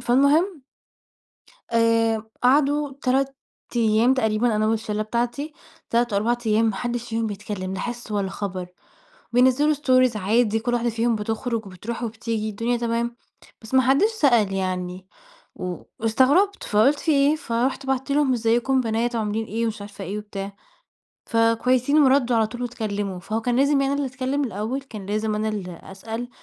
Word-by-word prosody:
فالمهم 285 +6 +3 1.1
آآ 230 -1 +3 0.2
قعدوا 285 +2 +3
3 270 +1 +1 0.4
أيام 230 +2 +4
تقريبًا 220 -2 +1
أنا 215 0 +1
والشلة 215 -1 -1
بتاعتي، 240 +7 -2 0.4
3 235 -1 +1
أو 200 - +3
4 235 +3 +1
أيام 220 +1 +3
ما 220 -3 0
حدش 240 +2 -3
فيهم 225 0 -1
بيتكلم 200 -2 -5
لا - - -4
حِس 240 -2 -5
ولا 200 -2 -1
خبر، 185 -3 -5 0.7
بينزلوا 260 +5 +4
Stories 255 -4 +3
عادي 220 +2 +2
كل 240 +2 -2
واحدة 240 0 +1
فيهم 230 +1 +1
بتخرج 225 +1 -3
وبتروح 210 +6 -6
وبتيجي 225 -1 -3
الدنيا 230 +4 -1
تمام، 235 0 -1 0.5
بس 220 +3 -12
ما 260 - +6
حدش 275 - +3
سأل 240 - +3
يعني 185 -1 -3 0.5
و 180 -1 -5 0.2
واستغربت! 270 - +3
فقلت 230 +8 +3
في 320 - 0
إيه، 285 +1 +4
فرُحت 260 0 -2
بعتّ 265 +1 -1
لهم 280 -2 +3
إزيكم 235 +3 +1
يا 260 - +4
بنات 235 +1 -1
عاملين 220 0 -1
إيه، 225 +2 -2
ومش 220 -2 -3
عارفة 205 -1 -8
إيه 195 +3 -4
وبتاع. 200 -1 -6 0.8
ف - - -4
كويسين 250 +5 +3
وردوا 260 -3 +3
على 220 -1 +3
طول 240 +3 -7
واتكلموا، 205 -6 -3
فهو 215 +4 -3
كان 240 +1 0
لازم 280 +3 +3
يعني 275 - +2
أنا - - +1
اللي - - -1
أتكلم 265 +3 -1
الأول؟ 225 +4 -3
كان 215 -7 -9
لازم 215 +1 -1
أنا 215 +1 -1
اللي 180 -5 -5
أسأل؟ 225 +5 -6
230 Hz, 165 wpm, -23 LUFS, 215-255 Hz, 1.1 s, ما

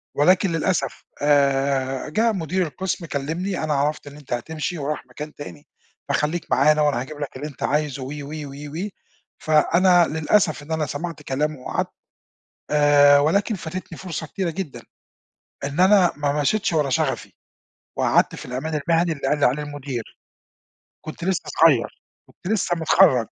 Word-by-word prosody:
ولكن 185 +5 +4
للأسف 165 +2 -1 0.2
آآ 140 -2 +2
جه 225 +9 +2
مدير 185 -2 -1
القسم 180 +2 -4
كلّمني 160 +6 -3
أنا 155 -1 0
عرفت 145 +1 -1
إن 145 - -10
أنت 145 -4 -7
هتمشي 160 +7 -3
ورايح 150 -1 -3
مكان 150 +5 -8
تاني، 90 - -10 0.4
فخليك 155 +3 0
معانا، 150 +4 +4
وأنا 145 -5 +2
هاجيب 145 +3 -8
لك 145 - -5
اللي 145 +3 -5
أنت 145 - -9
عايزه 145 -2 -1
و - - -6
و 145 0 -7 0.2
و 140 - -9 0.3
و - - -5 0.5
فأنا 175 +3 +4
للأسف 160 0 +1
إن 150 - -11
أنا 160 -1 0
سَمعت 160 +2 -5
كلامه 150 +2 -2
وقعدت، 125 - -2 0.8
آآ 145 -1 +6
ولكن 200 +9 +1
فاتتني 170 -1 -7
فرصة 170 -3 -5
كتيرة 185 +2 -2
جدًا، 165 -3 -6 0.8
إن 145 +4 -2
أنا 190 -2 +5
ما 145 0 0
مشيتش 190 +7 +1
ورا 150 -4 +1
شغفي، 125 - -1 0.6
وقعدت - - +2
في - - -8
الأمان 150 +5 -3
المهني 170 0 +3
اللي 140 -3 -3
قال 150 - +1
لي - - +5
عليه 140 +4 0
المدير. 145 -5 -5 1.0
كُنت 155 +2 -8
لسّه 190 0 0 0.2
صغيّر، 145 -8 +4 0.3
كُنت 195 - -4
لسّه 180 -4 0
مِتخرّج، 160 -6 +4
150 Hz, 155 wpm, -23 LUFS, 145-170 Hz, 1.0 s, آآ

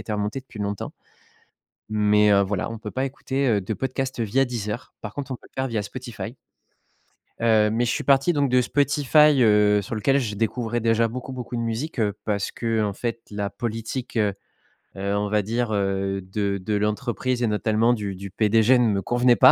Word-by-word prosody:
été 110 - -5
remontée 105 +5 -2
depuis 130 -4 -14
longtemps. 100 -1 -3 1.0
Mais, 105 -1 +4
heu, 100 0 +5
voilà, 100 +1 -2
on 115 - -6
peut 105 -1 -7
pas 130 +4 -1
écouter, 135 0 -2
heu, 105 -4 +3
de 100 +3 -3
podcasts 130 +1 -3
via 115 +5 +2
Deezer, 115 -2 -5
par 105 -1 -7
contre 140 -2 -5
on - - -3
peut - - -19
le - - -60
faire 130 - -1
via 110 -3 -1
Spotify. 120 +1 -7 1.0
Heu, 110 -2 +3
mais 115 +3 +1
je 120 - 0
suis - - -2
parti 140 +5 +4
donc 145 -4 +1
de 125 0 +4
Spotify, 145 +1 +4
heu, 105 -1 +5
sur 100 - -5
lequel 135 +6 +2
je 110 -6 -2
découvrais 115 +2 -1
déjà 115 0 +2
beaucoup, 125 +3 -6
beaucoup 125 -1 -5
de - - -1
musiques, 115 +7 -3
heu 105 -3 +1
parce 100 -2 -1
qu'en 110 -3 -1
fait 115 +2 -4
la 100 -1 -2
politique, 115 +4 -4
heu 105 -3 +2 0.6
heu, 100 +1 -1
on 105 0 -1
va 105 0 +2
dire, 115 +3 -1
heu, 95 -1 0
de 100 +1 -2
de 100 +3 -3
l'entreprise 115 +4 -1
et - - +3
notamment 110 +2 +2
du 105 -4 -3
du 100 +2 -7
PDG 110 +4 +4
ne 120 - +3
me 100 -3 +1
convenait 120 +4 +3
pas. 130 0 +8
115 Hz, 205 wpm, -24 LUFS, 105-125 Hz, 1.0 s, pas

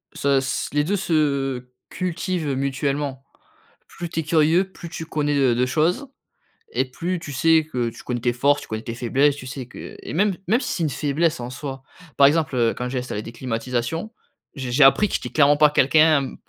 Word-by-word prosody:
Se 140 -1 +2
s 130 0 -2
les 145 0 +2
2 200 +6 0
se 140 -8 0 0.2
cultivent, 180 -2 -3
heu, 135 - -1
mutuellement. 140 0 -2 0.6
Plus 175 -1 -7
tu 165 - -3
es - - -8
curieux, 165 +5 +2
plus 170 - -9
tu 160 -1 -6
connais 150 -2 -1
de 130 -3 +3
de 125 +1 +2
choses 165 - 0 0.7
et 130 - +1
plus 170 +7 -3
tu 145 -4 -8
sais 160 +3 +3
que 120 -2 -1
tu - - -13
connais 120 -2 -3
tes 120 -1 +1
forces, 140 +4 +2
tu - - -11
connais 110 0 -4
tes 115 -1 -5
faiblesses, 135 +4 +2
tu 130 -3 -9
sais 130 -1 -6
que - - -10
et - - -7
même 195 +2 +2
même 230 +6 +3
si - - -4
c'est 170 - -2
une 155 - +1
faiblesse 155 +4 0
en 120 +1 -5
soi. 135 0 -7 0.3
Par 140 -1 +8
exemple, 155 -2 +1
heu, 115 -2 +2
quand 125 0 -4
j'ai 130 -1 -2
installé 115 -4 -4
des 115 - -8
climatisations, 125 - -3 0.4
je 130 -3 -5
j'ai 135 +3 +5
appris 170 +10 +6
que - - -2
j'étais - - -3
clairement 145 -1 +4
pas 150 -1 +6
quelqu'un 150 0 +3
145 Hz, 215 wpm, -22 LUFS, 130-160 Hz, 0.7 s, Par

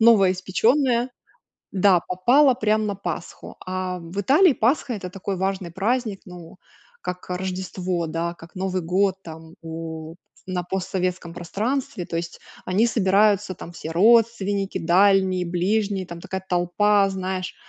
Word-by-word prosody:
новоиспечённая, 230 +5 +3 0.6
да, 190 -2 +4
попала 250 +10 +4
прям 215 -2 +1
на 205 - -2
Пасху. 175 -3 -6
А 185 0 -3
в 170 +4 -5
Италии 300 - +5
Пасха- 250 +3 +1
это 185 -3 -6
такой 195 +1 -4
важный 190 -2 -2
праздник, 215 +1 -1
ну, 175 0 -12 0.4
как 180 0 -6
Рождество, 185 -1 -3
да, 165 +2 -3
как 170 +2 -15
Новый 185 -1 -2
год 185 +3 +1
там, 160 0 -11
у 160 -1 -7 0.3
на 185 -1 -2
постсоветском 180 -1 -3
пространстве. 200 +4 -3
То 165 - -4
есть 170 0 -5 0.3
они 200 +6 +3
собираются, 205 -2 +2
там 170 - -10
все 165 -1 -7
родственники: 205 0 +3
дальние, 185 +1 +3
ближние, 195 +2 0
там 170 0 -8
такая 190 +2 -5
толпа, 195 +3 +3
знаешь. 185 -1 -4
190 Hz, 130 wpm, -23 LUFS, 175-205 Hz, 0.6 s, Италии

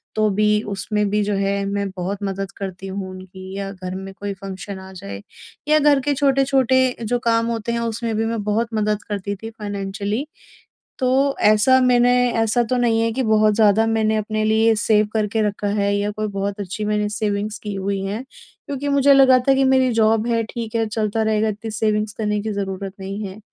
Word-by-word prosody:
तो 215 0 +2
भी 210 +1 +2 0.2
उसमें 210 +1 -1
भी 210 +1 +1
जो 205 0 -1
है 200 0 0
मैं 200 0 -2
बहुत 190 +3 -3
मदद 195 0 -3
करती 195 -1 -6
हूँ 190 0 -5
उनकी। 185 0 -10
या 195 0 -4
घर 185 -1 -6
में 195 0 -7
कोई 200 +1 -5
फ़ंक्शन 195 0 -7
आ 190 0 -11
जाए 100 - -8 0.5
या 305 0 +5
घर 290 -1 +4
के 285 +2 0
छोटे-छोटे 265 -2 +2
जो 245 +2 0
काम 230 -1 +1
होते 230 -1 -2
हैं, 235 - -1
उसमें 230 0 -2
भी 225 - 0
मैं 225 -2 -2
बहुत 215 +3 0
मदद 215 0 0
करती 200 0 -3
थी 225 +3 -8
फ़ाइनेंशियली। 205 +2 -4 0.7
तो, 270 +2 +2
ऐसा 215 +5 +5
मैंने 245 -1 +4 0.3
ऐसा 225 +2 +2
तो 250 +2 -1
नहीं 230 -2 +2
है 230 0 +1
कि 260 +3 -1
बहुत 215 -1 +3
ज़्यादा 215 0 +4
मैंने 220 -1 +1
अपने 215 0 -2
लिए 220 +1 +3
सेव 215 0 +3
करके 220 0 0
रखा 205 0 -3
है 200 0 +1
या 205 +1 -1
कोई 215 +1 -3
बहुत 200 +1 -2
अच्छी 200 +2 -5
मैंने 210 0 0
सेविंग्स 210 0 -2
की 210 -1 -5
हुई 195 0 -2
हैं। 205 +5 -3 0.4
क्योंकि 285 0 -4
मुझे 280 0 +5
लगा 265 -2 +6
था 270 - +6
कि 270 - +3
मेरी 260 -1 +3
जॉब 225 0 +2
है, 230 -1 +1
ठीक 225 0 -6
है, 225 -1 +2
चलता 215 0 -1
रहेगा 220 0 +1
इतनी 215 +2 -5
सेविंग्स 215 0 0
करने 210 -1 0
की 215 +1 -3
ज़रूरत 195 -1 -4
नहीं 195 +2 -5
है। 195 +2 -8
215 Hz, 205 wpm, -21 LUFS, 200-230 Hz, 0.7 s, लगा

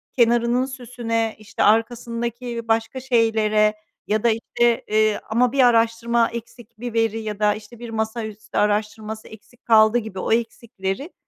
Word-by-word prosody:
kenarının 240 +1 +3
süsüne, 240 -3 -3
işte, 215 +1 -3
arkasındaki 235 +1 0
başka 225 +3 0
şeylere 220 -4 +2 0.3
ya 215 0 0
da, 235 - +4
işte, 235 +1 +1
eee, 215 0 +2
ama 240 +2 +2
bir 275 0 +2
araştırma 230 0 +2
eksik 235 -1 -10
bir 240 0 -5
veri 225 -1 +1
ya 215 -2 -5
da, 210 -1 +3
işte, 215 +2 -12
bir 240 -1 -8
masaüstü 220 -1 -4
araştırması 215 +1 -1
eksik 220 +3 -16
kaldı 220 0 +5
gibi 220 -5 -5
o - - -2
eksikleri 230 - -2
225 Hz, 145 wpm, -22 LUFS, 215-235 Hz, 0.3 s, kaldı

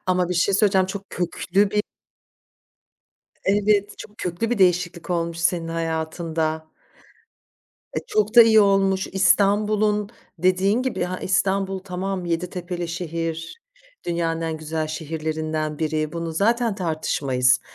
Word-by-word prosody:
Ama 180 -1 +1
bir 180 - -1
şey 185 +3 +2
söyleyeceğim. 195 -2 +3
Çok 195 +1 -7
köklü 190 +3 0
bir 210 0 +1 1.6
Evet, 205 0 +2
çok 210 - -11
köklü 180 +6 -2
bir 245 - 0
değişiklik 180 -1 +1
olmuş 170 -1 -1
senin 170 -1 0
hayatında. 160 -1 -2 1.3
E, - - +3
çok 215 +1 0
da 235 - +11
iyi 220 -1 +6
olmuş. 195 -1 +3
İstanbul'un 205 +2 +2 0.3
dediğin 185 +6 +2
gibi 260 -7 -2
ha 180 +1 -4
İstanbul 190 0 0
tamam 185 0 -4
7 170 +1 -2
tepeli 175 -1 -5
şehir, 165 - -4 0.5
dünyanın 165 -1 -1
en 160 -1 -2
güzel 155 0 -3
şehirlerinden 155 -1 -3
biri. 155 -1 -1
Bunu 170 -1 -4
zaten 230 +5 +1
tartışmayız. 140 -8 +1
180 Hz, 125 wpm, -23 LUFS, 165-200 Hz, 1.6 s, da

